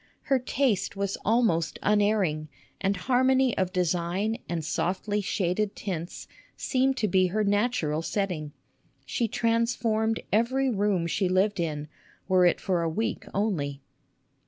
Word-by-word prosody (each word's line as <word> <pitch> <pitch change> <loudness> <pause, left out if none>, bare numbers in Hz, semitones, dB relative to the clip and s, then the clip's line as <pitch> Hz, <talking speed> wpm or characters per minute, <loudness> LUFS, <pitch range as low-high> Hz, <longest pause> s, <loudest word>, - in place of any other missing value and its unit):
Her 270 -2 +2
taste 250 -6 0
was 200 0 -2
almost 215 -8 +2
unerring, 205 -7 +2 0.3
and 195 0 +1
harmony 260 +4 +2
of 185 -1 0
design 180 +5 0
and 165 -3 -2
softly 195 +6 -1
shaded 195 +1 -1
tints 175 -4 -5 0.3
seemed 265 0 +1
to 215 - +1
be 185 -1 +3
her 215 +4 0
natural 205 -7 +1
setting. 170 -4 -2 0.5
She 235 - -1
transformed 230 -1 +1
every 255 +5 +2
room 200 -5 +1
she 180 +3 0
lived 195 +2 +2
in, 150 -3 -2 0.4
were 185 -2 +5
it 175 - +2
for 180 -3 0
a 165 - 0
week 220 +4 -2
only. 145 -10 -2
200 Hz, 135 wpm, -27 LUFS, 175-225 Hz, 0.5 s, were